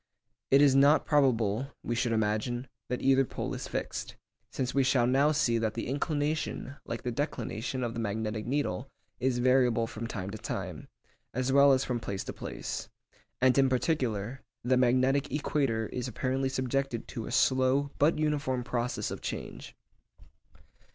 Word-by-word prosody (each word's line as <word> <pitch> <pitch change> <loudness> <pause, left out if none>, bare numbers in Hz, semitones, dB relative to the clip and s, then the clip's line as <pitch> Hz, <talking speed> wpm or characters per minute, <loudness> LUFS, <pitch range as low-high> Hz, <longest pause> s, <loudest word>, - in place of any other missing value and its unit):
It 140 +2 +6
is 140 -2 +6
not 140 +3 +5
probable, 130 -3 +2
we 120 - -2
should 120 0 0
imagine, 110 +3 0 0.2
that 125 - -2
either 135 0 +5
pole - - -4
is - - -5
fixed, - - -4 0.3
since 130 -1 -2
we 140 - +3
shall 125 -2 +3
now 135 +4 +4
see 125 -6 +2
that 110 -1 -1
the 115 - -3
inclination, 145 0 -2
like 115 - -4
the 125 - -2
declination 125 -1 -3
of 115 -1 -2
the 115 - -4
magnetic 110 0 -2
needle, 135 -9 -1 0.3
is 130 0 +1
variable 125 -2 +3
from 115 0 -6
time 100 -4 -5
to 110 - -7
time, - - -5 0.5
as 130 +1 0
well 140 0 +7
as 130 0 +3
from 125 -2 -1
place 100 -4 -4
to - - -6
place; - - -5 0.5
and 130 0 +5
in 135 -1 +4
particular, 125 -4 -1 0.2
the 125 +2 +3
magnetic 130 +3 +2
equator 135 -5 0
is 125 0 -3
apparently 130 +2 -1
subjected 130 -1 -2
to 115 - -5
a - - -6
slow 130 +2 +3
but 150 +3 +4
uniform 150 -4 0
process 120 0 -2
of - - -6
change. - - -6
130 Hz, 165 wpm, -30 LUFS, 115-135 Hz, 0.5 s, well